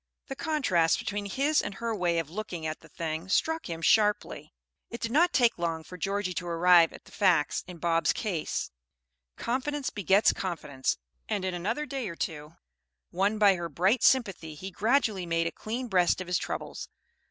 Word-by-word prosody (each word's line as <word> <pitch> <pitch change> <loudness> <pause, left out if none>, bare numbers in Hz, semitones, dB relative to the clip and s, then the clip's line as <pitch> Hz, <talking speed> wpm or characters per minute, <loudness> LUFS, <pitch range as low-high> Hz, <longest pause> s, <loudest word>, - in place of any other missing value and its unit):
The 270 - -4
contrast 260 - +2
between 205 -3 -3
his 280 +9 +2
and 200 -1 -5
her 230 +2 -3
way 175 -3 +1
of 160 -2 -2
looking 180 -4 -5
at 155 0 -3
the 160 - -17
thing 160 +3 -4
struck 320 - 0
him 165 -1 -5
sharply. 210 +3 +2 0.4
It 235 - -7
did 230 - -3
not 340 +7 +4
take 240 - +3
long 165 -2 -2
for 180 - -11
Georgie 195 +1 -2
to 180 0 -4
arrive 170 0 +5
at - - -13
the - - -17
facts 175 -7 +2
in 180 -1 -9
Bob's 165 0 +2
case. 185 -8 -3 0.7
Confidence 270 +3 -2
begets 200 +1 +3
confidence; 150 -8 -2 0.3
and 205 -3 -1
in 185 - -1
another 220 +12 -2
day 270 -7 -4
or 170 - -7
two, 155 -1 -5 0.6
won 200 +4 +1
by 205 -2 +6
her 175 -2 -4
bright 190 - +2
sympathy, 195 -11 +2
he 190 +6 -7
gradually 215 -3 +1
made 165 0 +1
a 170 - -1
clean 240 +4 -5
breast 180 -5 +2
of 185 - -4
his 180 0 0
troubles. - - -5
190 Hz, 185 wpm, -28 LUFS, 170-225 Hz, 0.7 s, by